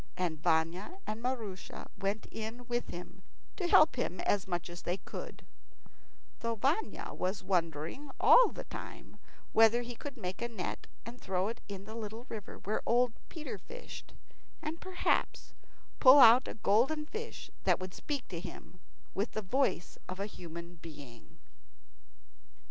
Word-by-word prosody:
And 165 -4 -1
Vanya 170 - +1
and 215 +1 -4
Maroosia 230 -7 -4
went 200 +2 -2
in 225 +3 -5
with 240 0 -1
him 180 +2 -8 0.3
to 360 - -1
help 310 -4 +6
him 185 -7 -1
as 200 -2 +1
much 175 -2 -2
as 175 0 -8
they 175 +2 -1
could; - - -8 0.9
though 230 0 -1
Vanya 280 - 0
was 185 +2 -2
wondering 170 - -1
all - - +8
the - - -7
time - - -9 0.4
whether 225 +2 +6
he 240 0 -6
could 280 +3 -7
make 185 -2 -4
a 235 - 0
net, 220 -7 -5 0.2
and 240 +2 -9
throw 190 +2 0
it 230 - -6
in 195 -1 -6
the 215 - -8
little 225 +1 -6
river 215 -3 -6
where 210 +2 -1
old 240 0 +3 0.2
Peter 310 -3 -6
fished, 485 +1 -10 0.4
and 325 0 -5
perhaps 370 -1 0 0.5
pull 260 +1 +10
out 245 -1 +9
a - - -5
golden 245 +9 +3
fish 445 +7 -6
that - - +4
would 185 0 -6
speak 285 -4 -4
to 170 - -4
him 180 +1 -9 0.3
with 200 +3 -1
the 215 - -2
voice 250 -3 0
of 185 +1 -5
a 200 - -1
human 170 -3 -8
being. 145 -8 -12
215 Hz, 155 wpm, -33 LUFS, 180-250 Hz, 0.9 s, pull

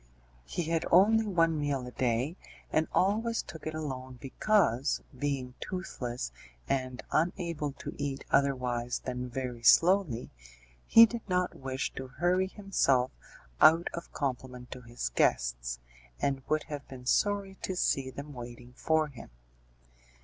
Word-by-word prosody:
He 170 - -3
had 165 +1 0
only 215 +5 +5
one 165 -5 +2
meal 140 -3 -1
a 125 - -7
day, 125 +6 0 0.4
and 155 0 +2
always 220 +4 +1
took 160 - -9
it 155 - -3
alone 130 -4 -5
because, 140 - +1
being 135 -2 -2
toothless 125 - -4 0.4
and 130 -2 -2
unable 165 -3 0
to - - -7
eat 140 -1 -3
otherwise 125 -3 +1
than 125 0 -3
very 125 -1 -4
slowly, 165 - +4 0.6
he 230 - +10
did 235 +1 -5
not 180 0 +1
wish 130 0 -4
to 130 - -6
hurry 180 +3 +2
himself 160 - +1 0.5
out 165 +2 +7
of 170 - -7
compliment 125 -2 -4
to 125 - -7
his 120 - -4
guests, - - +1 0.4
and 135 -1 0
would 155 0 +2
have 145 -2 -7
been 125 -2 -10
sorry 200 +5 +1
to 185 - -3
see 135 -6 +1
them 145 +2 -8
waiting 120 0 -9
for 160 +3 +1
him. 130 -5 -11
140 Hz, 140 wpm, -30 LUFS, 125-175 Hz, 0.6 s, he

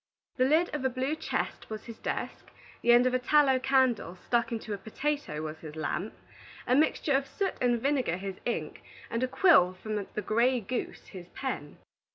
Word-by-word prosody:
The 255 - +4
lid 315 +5 +3
of 295 -3 -2
a 265 - +2
blue 260 +4 -1
chest - - -3
was 215 -1 -6
his 230 -2 -9
desk, - - -4 0.3
the 240 - +4
end 240 +1 +6
of 255 - +2
a 255 - +2
tallow 270 0 +4
candle 260 -8 +2
stuck 235 +7 0
into 220 -2 -4
a - - -3
potato 220 - -3
was 155 0 -6
his 155 -1 -9
lamp, 175 +6 -3 0.5
a 250 - +2
mixture 300 0 +2
of 275 0 +1
soot 390 -2 -2
and 240 -1 +2
vinegar 260 - 0
his 190 0 -6
ink, 240 - -3 0.3
and 230 - -1
a 255 - +2
quill 255 - +5
from 210 +2 -4
the 215 - -1
gray 240 +4 +2
goose 235 +3 -4
his 180 -3 -10
pen. 255 - -4
245 Hz, 195 wpm, -29 LUFS, 205-270 Hz, 0.5 s, end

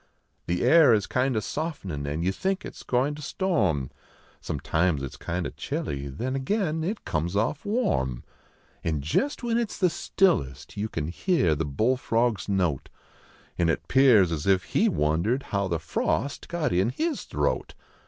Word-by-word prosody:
The 90 +1 0
air 155 -8 +7
is 105 - 0
kind 125 -1 0
o - - +1
soft 155 +1 -4
nin 75 -6 -4
and 75 +3 -2
yon 95 +2 +1
think 190 - -2
it - - -7
s - - -12
goin 130 +4 +1
to 150 - -9
storm; 100 - 0 0.5
Sometimes 80 -4 0
it 70 - -4
s - - -11
kind 85 +1 -3
o - - -3
chilly, 70 -1 -4
then 120 - -3
again 160 +2 0
it 205 +6 -3
comes 85 +4 -1
off 115 +8 0
warm; 65 - 0 0.6
An 80 -3 -1
jest 255 - 0
when 235 -1 +1
it 235 -3 -1
s - - -8
the 180 -3 +3
stillest 115 - 0
you 105 +2 -2
can 80 -4 -3
hear 90 - +2
the 75 +1 -1
bullfrog 115 - +1
s 95 - -7
note, 90 -8 0 0.7
An 85 -1 +3
it 85 - -1
pears 120 -10 +5
as 80 +2 -3
if 95 -2 +4
he - - +2
wonder 80 - +1
d 135 - -11
how 100 -1 +1
the 85 -2 0
frost 110 - -2
got 170 - -1
in 95 +5 +2
his 315 - -2
throat. - - -1
105 Hz, 185 wpm, -26 LUFS, -, 0.7 s, air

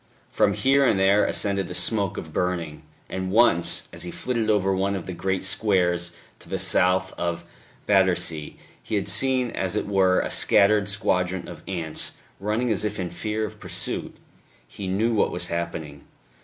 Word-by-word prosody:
From - - +2
here 135 +1 +3
and 110 -7 +3
there 100 +2 +4
ascended 100 -2 0
the 90 - -7
smoke 100 -3 0
of 80 -1 -7
burning; 85 -4 -2 0.3
and 95 0 -4
once, 100 -5 +3
as - - -8
he 90 - -3
flitted 115 +2 -2
over 95 -2 +2
one 100 +1 0
of 95 - -5
the 95 - -5
great 95 +2 -2
squares 90 -4 +1 0.3
to - - -16
the - - -2
south 95 +1 +2
of 85 -1 -2 0.4
Battersea, 90 -6 +1 0.2
he - - -4
had 100 - -1
seen 130 -3 +2
as 95 +1 -2
it 105 - -1
were 95 -2 +3
a - - -2
scattered 105 0 +3
squadron 90 -2 -1
of 85 -3 -9
ants 85 -5 -3 0.3
running 110 +4 -1
as 105 -1 0
if 105 -1 -3
in 90 -2 -3
fear 105 +5 -2
or - - -6
pursuit.... - - -3 0.5
He 100 - -7
knew 110 +5 +1
what 105 - +2
was - - -3
happening.... 80 -4 -4
95 Hz, 175 wpm, -24 LUFS, 90-105 Hz, 0.5 s, there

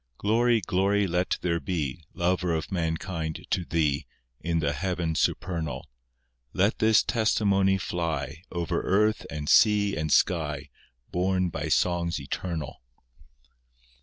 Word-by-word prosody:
Glory, 115 +2 +2
glory 100 +3 +1
let 90 0 0
there 85 -1 0
be, 80 -6 -3
Lover 90 -1 +1
of 80 - -4
mankind 80 -2 -3
to 90 - +1
Thee, 75 -4 0 0.3
In 85 0 -1
the 75 -3 0
heaven 85 +1 -2
supernal. 80 -5 -2 0.7
Let 100 +4 +1
this 110 -2 +5
testimony 100 -4 +2
fly 85 -2 -3
Over 85 -3 -1
earth, 105 +3 +1
and 75 -2 -5
sea, 105 0 +4
and 75 -1 -2
sky, 75 -5 +1 0.4
Borne 90 0 +1
by - - -4
songs 85 -2 +1
eternal. 80 +1 -5
85 Hz, 120 wpm, -27 LUFS, 80-95 Hz, 0.7 s, this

